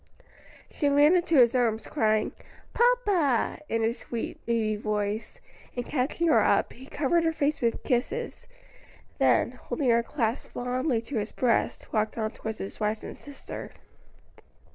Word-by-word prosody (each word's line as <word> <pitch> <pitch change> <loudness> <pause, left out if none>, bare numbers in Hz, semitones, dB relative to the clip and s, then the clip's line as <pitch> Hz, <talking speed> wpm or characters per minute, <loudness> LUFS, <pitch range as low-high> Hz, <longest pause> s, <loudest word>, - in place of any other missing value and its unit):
She 290 - +1
ran 290 +4 +5
into 345 -2 +2
his 245 -4 +6
arms, 230 -3 +1
crying, 215 -6 +1 0.4
"Papa," 410 - +2
in 225 0 0
her 225 +1 +2
sweet 235 -1 -6
baby 225 -2 +1
voice, 210 0 -3 0.4
and 245 -1 -3
catching 290 +5 -1
her 315 - +5
up, - - +2
he 260 +2 -13
covered 320 +5 +1
her 325 - +2
face 300 -1 -1
with 235 -1 0
kisses; 265 - -2 0.7
then, - - +3
holding 265 -6 -1
her 235 0 +4
clasped 230 0 -2
fondly 250 0 -1
to 245 +1 -4
his 210 +1 -4
breast, 240 -3 0
walked 215 +1 0
on 220 -1 -1
towards 220 0 -6
his 195 - -7
wife 215 0 -1
and - - -7
sister. 285 -1 -9
245 Hz, 150 wpm, -27 LUFS, 220-290 Hz, 0.7 s, his